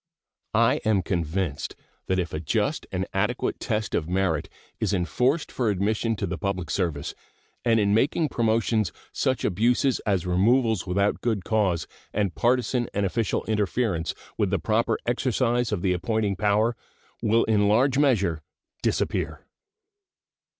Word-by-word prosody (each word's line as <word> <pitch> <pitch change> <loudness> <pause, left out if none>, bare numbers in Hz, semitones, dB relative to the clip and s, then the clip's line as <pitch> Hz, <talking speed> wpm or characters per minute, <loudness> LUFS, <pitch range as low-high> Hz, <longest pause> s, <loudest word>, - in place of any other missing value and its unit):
I - - +4
am 105 -4 +2
convinced 85 -3 -2 0.3
that 95 - +1
if 90 -2 -2
a 75 - -2
just 75 - -1
and - - -1
adequate - - -1
test 110 -1 -2
of 80 0 -1
merit 90 -5 0 0.3
is 105 - +1
enforced 125 - 0
for 120 -4 0
admission 110 +3 0
to 100 - -2
the 90 -1 -4
public 100 -4 -2
service 80 -7 -1 0.5
and 115 -1 +3
in 100 -1 +2
making 145 +7 +2
promotions 110 -4 +1 0.2
such 130 -2 0
abuses 120 +7 +2
as 95 -5 0
removals 110 +3 +2
without 100 +3 +1
good 110 -6 -1
cause 95 -8 +1 0.3
and 100 -4 0
partisan 125 0 +1
and 100 0 +1
official 110 +3 0
interference 105 -5 0 0.2
with - - +2
the - - +1
proper 115 +1 +1
exercise 120 -1 +1
of 100 -4 -2
the 95 -2 +2
appointing 105 +2 0
power 105 +4 +2 0.5
will 115 +2 +3
in 105 -2 +2
large 130 +6 +3
measure 100 - +2 0.4
disappear. - - -1
105 Hz, 145 wpm, -25 LUFS, 90-115 Hz, 0.5 s, I